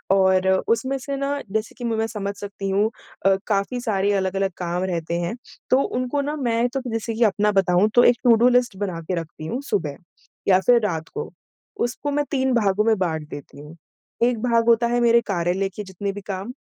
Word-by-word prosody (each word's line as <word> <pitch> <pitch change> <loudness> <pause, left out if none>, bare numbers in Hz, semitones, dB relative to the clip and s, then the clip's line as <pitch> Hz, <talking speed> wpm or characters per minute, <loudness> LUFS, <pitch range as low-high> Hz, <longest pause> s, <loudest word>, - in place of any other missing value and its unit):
और 190 -1 +3 0.2
उसमें 260 +4 +1
से 275 +1 -4
ना 280 +1 -1
जैसे 220 +1 -2
कि 245 - -8
म 230 -1 0
मैं 225 0 0
समझ 200 -2 -4
सकती 200 -1 -5
हूँ 205 +3 +2 0.4
अ, 195 0 +5
काफ़ी 205 +4 0
सारे 205 -4 +1
अलग-अलग 195 0 0
काम 175 +1 -2
रहते 170 -3 -2
हैं। 175 +6 -2 0.3
तो 255 - +5
उनको 255 +3 -1
ना 295 +2 -3
मैं 240 -3 +1
तो 270 +1 -3
जैसे 225 0 -2
कि 230 - +1
अपना 210 0 +2
बताऊँ 190 +1 +3
तो 245 - +7
एक 245 - +6
टु 240 -2 +6
डू 240 +3 +4
लिस्ट 245 -4 +2
बना 185 -4 -3
के 180 +3 -3
रखती 160 -1 -10
हूँ 245 +11 -3
सुबह, 165 -9 -1 0.5
या 185 -1 +6
फिर 240 +5 +4
रात 165 -4 -2
को। - - -5 0.5
उसको 285 +4 -4
मैं 290 +1 0
3 265 -2 +1
भागों 210 -3 +2
में 220 -2 +3
बाँट 160 -4 -2
देती 140 0 -10
हूँ, 150 +2 -11 0.5
एक 240 -2 +2
भाग 235 -2 +2
होता 235 0 +4
है 240 +1 +1
मेरे 235 0 +5
कार्यालय 185 +1 0
के 210 - -5
जितने 195 +1 -4
भी 205 - -7
काम, 195 +2 -4
210 Hz, 215 wpm, -23 LUFS, 190-240 Hz, 0.5 s, तो